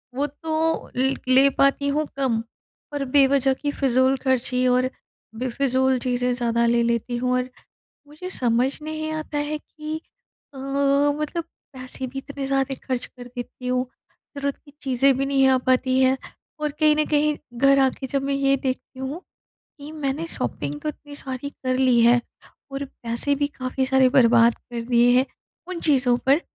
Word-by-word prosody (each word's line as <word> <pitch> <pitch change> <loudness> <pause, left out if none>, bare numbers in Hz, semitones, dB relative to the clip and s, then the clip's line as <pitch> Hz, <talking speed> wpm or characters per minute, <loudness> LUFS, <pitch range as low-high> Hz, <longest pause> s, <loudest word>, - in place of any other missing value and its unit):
वो 285 +2 0
तो 320 +2 -2
लि 265 +2 +2
ले 265 +2 +6
पाती 275 +1 +3
हूँ 300 +2 0
कम 250 -5 +1 0.5
और 285 -1 -2
बेवज़ह 270 -1 +4
की 290 +2 -3
फ़िज़ूल 260 -1 +2
ख़र्ची 255 -1 0
और 250 +1 +2 0.5
बेफ़िज़ूल 260 +2 +1
चीज़ें 250 0 0
ज़्यादा 235 -1 +1
ले 235 0 +3
लेती 235 +1 -1
हूँ 250 +1 0
और 255 0 -1 0.6
मुझे 305 +5 -8
समझ 250 -5 +1
नहीं 310 0 -4
आता 310 -1 -4
है 295 +1 -1
कि 305 +1 -7 0.6
अ, - - -11
मतलब 280 +4 +1 0.3
पैसे 255 0 -5
भी 265 +2 -9
इतने 280 0 -6
ज़्यादा 270 0 0
ख़र्च 255 -2 -1
कर 245 -1 -13
देती 245 0 -8
हूँ, 250 0 +1 0.5
ज़रूरत 280 0 -2
की 290 - -17
चीज़ें 270 0 +3
भी 275 - 0
नहीं 275 -1 +3
आ 260 - +4
पाती 255 0 +2
हैं 260 0 +4 0.4
और 300 -1 -1
कहीं 305 -1 +5
न 305 0 +2
कहीं, 300 0 +2 0.2
घर 275 +3 +4
आ 265 -1 +5
के 265 +1 -7
जब 275 +1 -1
मैं 280 0 -1
ये 275 0 +2
देखती 260 0 -4
हूँ, 270 +6 -5 0.6
कि 290 +1 -9
मैंने 300 +1 -3
शॉपिंग 145 - -3
तो - - -3
इतनी 290 -1 -8
सारी 265 0 -5
कर 255 -2 -2
ली 255 -2 +4
है 240 +1 +5 0.5
और 275 +1 -4
पैसे 240 +1 -2
भी 285 +1 0
काफ़ी 260 0 -1
सारे 265 0 +4
बर्बाद 235 -2 +6
कर 235 -1 -7
दिए 240 0 +5
हैं, 260 - +2 0.4
उन 365 -2 -5
चीज़ों 260 -6 +3
पर, 275 +4 +5
265 Hz, 175 wpm, -23 LUFS, 250-285 Hz, 0.6 s, ले